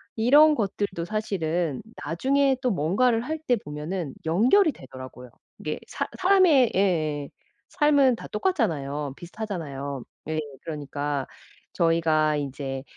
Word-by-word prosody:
이런 290 +7 +6
것들도 200 -6 -2
사실은 175 -7 -2 0.2
나중에 270 - +2
또 255 - +1
뭔가를 225 +7 +2
할 315 +5 -4
때 245 - +4
보면은 150 - -5
연결이 255 - +4
되더라고요. 130 - -11 0.3
이게 150 - -4
사 - - -3
사람의 360 - +5
예예. 155 -7 +1 0.4
삶은 285 -4 +4
다 - - -9
똑같잖아요. 150 - -1
비슷하잖아요. 155 - -5 0.3
예. 155 0 -1 0.2
그러니까 145 -2 -3 0.5
저희가 160 -3 +2
이제 135 -2 -4
170 Hz, 280 characters per minute, -25 LUFS, 145-245 Hz, 0.5 s, 이런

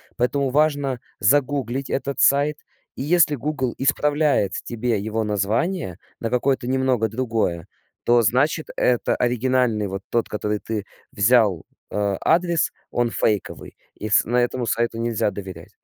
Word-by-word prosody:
Поэтому 130 +3 0
важно 145 -4 +1 0.2
загуглить 135 -2 +1
этот 140 0 -2
сайт, 145 +2 +3 0.4
и - - -6
если 155 0 +3
"Гугл" 130 -2 -2
исправляет 145 - +1
тебе 120 -1 -1
его 110 +1 -2
название 105 - -1 0.2
на 115 - -1
какое-то 125 0 0
немного 130 -4 +1
другое, 110 -8 -2 0.4
то 120 0 +5
значит, 145 +8 +1
это 125 -1 +2
оригинальный, 125 -3 +1
вот 95 +1 -5
тот, 115 - 0
который 105 0 -2
ты 105 -3 -4 0.3
взял, 100 -5 +3 0.3
э, 100 -2 0
адрес, 170 -1 +2 0.2
он 120 -1 +1
фейковый, 105 -3 -2 0.2
и 110 - -5
с - - +5
на 120 +2 -1
этому 120 0 0
сайту 115 +1 -1
нельзя 115 -2 0
доверять. 95 -4 -9
120 Hz, 135 wpm, -22 LUFS, 110-140 Hz, 0.4 s, то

